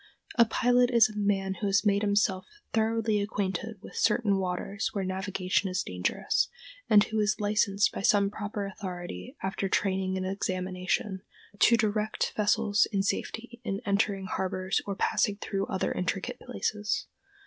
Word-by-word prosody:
A 235 - +6
pilot 245 +2 +3
is 230 -3 +5
a 215 - -10
man 195 -2 0
who 205 - +1
has 200 +2 +2
made 200 -1 +3
himself 205 -2 +1 0.3
thoroughly 220 -1 +1
acquainted 200 +1 -2
with - - -11
certain 210 -3 +2
waters 190 +3 -2
where 200 - -1
navigation 190 0 -1
is 185 0 -1
dangerous, 90 0 0 0.4
and 205 -1 +7
who 220 0 -2
is 210 +1 +1
licensed 205 -1 +2
by - - -5
some 200 0 +3
proper 205 -1 -4
authority, 180 - -7
after 195 0 -2
training 190 -1 0
and 185 - -2
examination, 185 0 -2 0.4
to 235 - +6
direct 215 0 0
vessels 210 0 +3
in 195 -2 +1
safety 235 +4 -3
in 195 -3 -2
entering 200 -1 +1
harbors 190 +1 -1
or 200 - -2
passing 200 +1 +1
through 200 -1 -3
other 190 - -1
intricate 195 +7 -2
places. 210 -4 -2
200 Hz, 150 wpm, -29 LUFS, 190-215 Hz, 0.4 s, and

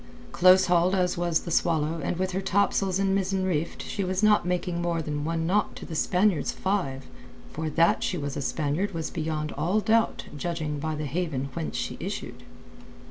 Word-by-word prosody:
Close 185 +1 +6
hauled 180 +1 +3
as 180 -1 +1
was 175 -2 +1
the 170 - -6
Swallow 160 -1 +1
and 165 - -1
with 185 +1 -1
her 190 +1 -2
top 200 +1 +2
sails 190 -2 0
and 195 0 +1
mizzen 190 -1 0
reefed 165 -3 -2
she 200 - -3
was 185 +2 -1
not 210 -4 +4
making 180 -1 -1
more 170 -1 0
than 150 -2 -3
one 165 +1 -1
knot 200 +4 +1
to - - -8
the 170 - -8
Spaniard's 180 +2 +2
five—for 135 - -4
that 165 +2 +3
she 180 - -1
was 145 -3 -4
a - - -3
Spaniard 155 +7 -1
was 160 -1 -3
beyond 155 -2 -2
all 195 +5 0
doubt 220 +2 +1
judging 155 -1 -3
by 155 +1 -2
the 150 0 -3
haven 145 -3 -2
whence 160 - -4
she 80 0 -3
issued. - - -5
170 Hz, 190 wpm, -27 LUFS, 155-185 Hz, -, Close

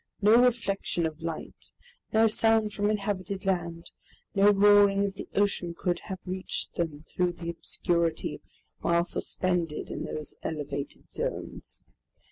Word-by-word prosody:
No 220 +4 +6
reflection 200 -8 +1
of 160 0 -4
light, 165 -1 -6 0.4
no 220 +1 +5
sound 220 -1 +3
from 205 0 +1
inhabited 200 -2 -2
land, 170 -3 -2 0.4
no 200 +1 +6
roaring 205 0 +6
of 195 - -2
the - - -8
ocean 195 -4 +1
could 175 -1 0
have 190 -2 -4
reached 185 0 -3
them, 160 -3 -3
through 180 -1 0
the 170 -1 -5
obscurity, 170 0 -1 0.4
while 170 0 +2
suspended 175 -3 -1
in - - -4
those 155 - -4
elevated 145 -3 -5
zones. - - -5
185 Hz, 130 wpm, -28 LUFS, 170-205 Hz, 0.4 s, No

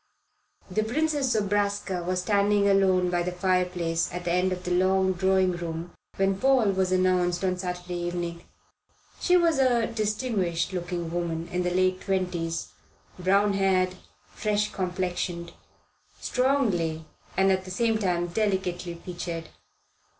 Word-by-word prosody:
The 215 +4 +1
Princess 285 +2 0
Zobraska 205 -3 0
was 180 +1 -1
standing 205 0 +3
alone 190 -2 +3
by 175 -1 +1
the 180 +1 -2
fireplace 180 -2 0
at 175 0 -6
the 175 - 0
end 180 +1 +2
of 180 0 -4
the 180 - -3
long 190 +1 +3
drawing 190 0 +2
room 170 -1 -5 0.2
when 195 0 +1
Paul 260 -5 +4
was 190 -1 0
announced 185 -1 +2
on 185 -1 0
Saturday 180 -1 -4
evening. 175 -1 -4 0.8
She 360 0 +4
was 335 -4 +3
a 245 -3 +3
distinguished 210 -6 -1
looking 175 -2 -3
woman 170 -1 -2
in 180 +1 -1
the 180 - 0
late 185 +1 +1
twenties 180 -4 -2 0.5
brown 200 +3 +3
haired, 190 -2 +2 0.4
fresh 210 -1 0
complexioned, 180 -2 -3 0.7
strongly 205 - 0 0.3
and 190 0 +4
at 190 0 +1
the 185 - -10
same 225 +3 +1
time 175 -4 0
delicately 180 -2 -1
featured. 170 -1 -6
185 Hz, 135 wpm, -26 LUFS, 175-200 Hz, 0.8 s, Paul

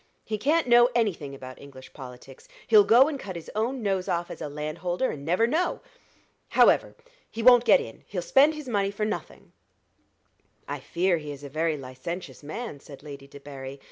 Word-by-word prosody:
He 215 -1 -3
can't 310 +9 +2
know 240 0 +6
any 225 -5 +2
thing 140 -4 -9
about 130 -1 -11
English 130 -2 -13
politics. 130 0 -12 0.2
He'll 215 -2 +7
go 240 +7 +6
and 295 -3 -4
cut 190 -6 -7
his 170 - -8
own 235 +3 -2
nose 195 -2 -1
off 170 0 -2
as - - -9
a 150 - -4
landholder, 170 - -3
and 140 - -8
never 180 +9 +2
know. 320 +9 0 0.7
However, - - +4 0.3
he 225 - -5
won't 245 0 +7
get 215 - +6
in 115 - -9
he'll 180 -3 -4
spend 290 - +4
his 300 -3 -8
money 200 -4 0
for 205 +1 -3
nothing." 215 - -6 1.2
"I - - -4
fear 175 0 0
he 150 -1 -7
is 145 0 -10
a 140 - -7
very 155 +2 -1
licentious 135 +7 -7
man," 155 +2 -6
said 140 0 -13
Lady 140 -2 -10
Debarry. 140 -1 -9
175 Hz, 190 wpm, -26 LUFS, 140-230 Hz, 1.2 s, He'll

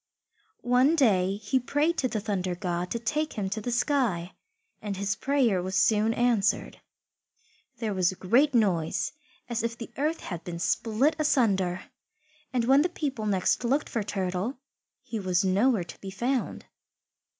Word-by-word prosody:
One 250 +6 +4
day 195 - +3
he 210 +5 0
prayed 290 +6 +1
to 260 - +2
the 230 -3 -2
Thunder 190 -4 -2
God 175 -1 -3
to 235 - -2
take 300 +7 -2
him 195 -4 -3
to 215 +1 -2
the 245 - -4
sky, 235 - 0 0.5
and 205 -2 -4
his 200 0 -1
prayer 245 -6 +1
was 185 +1 -4
soon 210 +3 +3
answered. 235 -5 +1 1.0
There 220 -2 -2
was 185 -1 +2
a - - -9
great 250 +10 +2
noise, 180 -8 +1 0.4
as 235 -1 -2
if 230 0 -3
the 230 0 -8
earth 305 +4 -1
had 175 -4 -6
been 175 -1 -6
split 225 - +1
asunder, 195 - +1 0.7
and 245 -3 0
when 270 +3 +5
the 345 - +1
people 275 -10 -3
next 190 +3 +1
looked 270 +5 0
for 230 - -1
Turtle 195 +4 -2 0.5
he 230 -4 -5
was 185 0 +1
nowhere 205 +2 +2
to 170 - -12
be 195 - -6
found. 240 +6 -2
220 Hz, 160 wpm, -27 LUFS, 190-255 Hz, 1.0 s, when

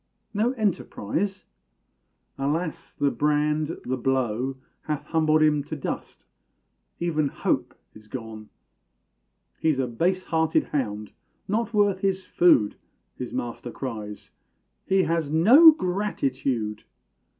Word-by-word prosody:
No 220 +5 +1
enterprise? 200 - -2 0.9
Alas! 155 +4 -3
the 140 -1 +1
brand, 150 +1 0
the 130 +1 -1
blow, 130 0 0 0.3
Hath 150 -2 -2
humbled 155 0 +2
him 150 -2 +3
to 155 - -5
dust 145 - -6 0.7
even 155 -4 0
hope - - -1 0.2
is 110 0 -16
gone! 110 -3 -8 1.1
"He's 155 -4 +2
a 135 - +1
base 175 +10 0
hearted 160 -1 +1
hound 105 -7 -3 0.4
not 230 +3 -1
worth 205 -3 +2
his 190 -1 -1
food" 145 -12 +4 0.4
His 125 - -6
master 120 0 -4
cries; 110 -5 -7 0.6
"he 190 0 +3
has 165 -4 0
no 230 - +8
gratitude!" 135 - -2
150 Hz, 110 wpm, -25 LUFS, 125-185 Hz, 1.1 s, no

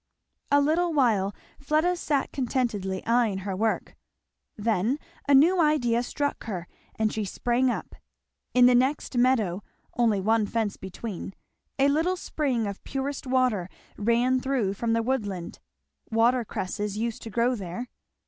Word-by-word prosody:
A 285 - +5
little 325 +4 +2
while 215 -9 +2 0.2
Fleda 310 +5 +1
sat 295 -5 -1
contentedly 225 -8 -1
eying 230 -4 +2
her 195 -2 -2
work; 220 +3 -1 0.6
then 220 +4 +1 0.3
a 280 - +6
new 340 +6 +5
idea 250 -7 +2
struck 285 +3 -3
her 180 -6 -5 0.3
and 220 -1 0
she 215 - -1
sprang 240 +6 +1
up. - - -4 0.6
In 250 -1 +7
the 250 - +6
next 260 +2 +1
meadow, 235 -7 +2 0.3
only 225 -4 +2
one 215 +2 +2
fence 220 -3 -1
between, 190 0 -7 0.4
a 275 0 +4
little 325 +6 +1
spring 270 -10 -1
of 200 -1 -6
purest 270 +1 -4
water 250 -8 +1 0.3
ran 240 +4 +2
through 255 -7 0
from 225 +3 -1
the 230 0 +1
woodland; 205 -9 -3 0.5
water 235 +2 +3
cresses 205 0 -4
used 230 0 -2
to 225 - -7
grow 235 +4 +1
there. 205 +2 -5
235 Hz, 145 wpm, -26 LUFS, 210-265 Hz, 0.6 s, In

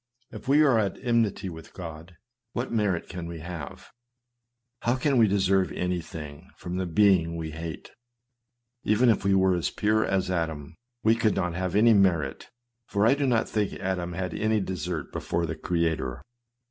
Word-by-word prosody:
If - - -10
we 145 +3 +5
are 130 -6 +4
at 100 -3 -1
enmity 115 -5 +1
with 80 -3 -9
God, 80 -1 -9 0.4
what 120 +2 -3
merit 105 -7 0
can 85 -2 -6
we 85 -2 -7
have? 85 -4 -8 0.9
How 120 +2 +1
can 130 0 +2
we 110 - +6
deserve 95 -3 +2
anything 85 -2 -5
from 90 +1 -5
the 95 -1 -1
being 85 -2 +3
we 80 -1 -4
hate? 80 +1 -7 0.9
Even 115 +4 +3
if 110 - +2
we 100 0 +3
were 95 -2 +3 0.2
pure 110 +1 +2
as 95 -1 0
Adam, 80 -4 -3 0.3
we 110 - +5
could 110 -2 +1
not 90 -3 -1
have 90 +1 -2
any 115 +2 +6
merit; 85 -9 +1 0.4
for 100 0 +1
I 115 - +6
do 140 -1 0
not 120 -3 +2
think 105 -2 -1
Adam 90 -2 -3
had 90 0 -3
any 110 +3 +1
desert 90 -5 -4
before 85 0 -2
his 80 -1 -4
Creator. 80 -7 -1
95 Hz, 170 wpm, -27 LUFS, 85-105 Hz, 0.9 s, we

